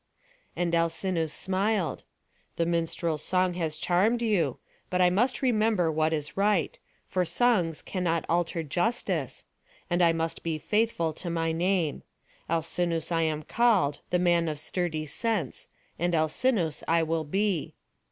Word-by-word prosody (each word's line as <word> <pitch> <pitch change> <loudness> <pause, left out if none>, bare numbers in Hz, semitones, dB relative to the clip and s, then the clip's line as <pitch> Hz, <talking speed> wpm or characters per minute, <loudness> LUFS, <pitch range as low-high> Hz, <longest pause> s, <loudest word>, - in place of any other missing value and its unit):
And 175 -1 -1
Alcinous 165 -1 0
smiled. 190 0 -1 0.5
"The 170 - +1
minstrel's 165 -2 -1
song 185 -1 +1
has 160 -3 -3
charmed 205 +9 +2
you; 180 - +1 0.3
but 180 - 0
I 180 -1 +5
must 245 +9 +1
remember 215 -8 +2
what 155 0 +1
is 150 0 -3
right; 200 -3 +1 0.3
for 185 - 0
songs 180 -5 +1
cannot 170 -3 -1
alter 170 -1 0
justice; 180 - -1 0.5
and 175 +1 +2
I 170 -1 +6
must 165 0 -2
be 165 -2 -2
faithful 210 -3 0
to 175 +3 -6
my 165 -1 0
name. 170 -2 0 0.5
Alcinous 165 0 -1
I 165 -1 +2
am 155 -1 -1
called, 205 -10 +2
the 180 - +2
man 175 -2 +2
of 150 -2 -3
sturdy 160 -1 -2
sense, 185 - -2 0.3
and 175 +1 +1
Alcinous 160 - +1
I 165 0 +3
will 160 0 -1
be." 190 +1 -1
170 Hz, 140 wpm, -28 LUFS, 160-190 Hz, 0.5 s, I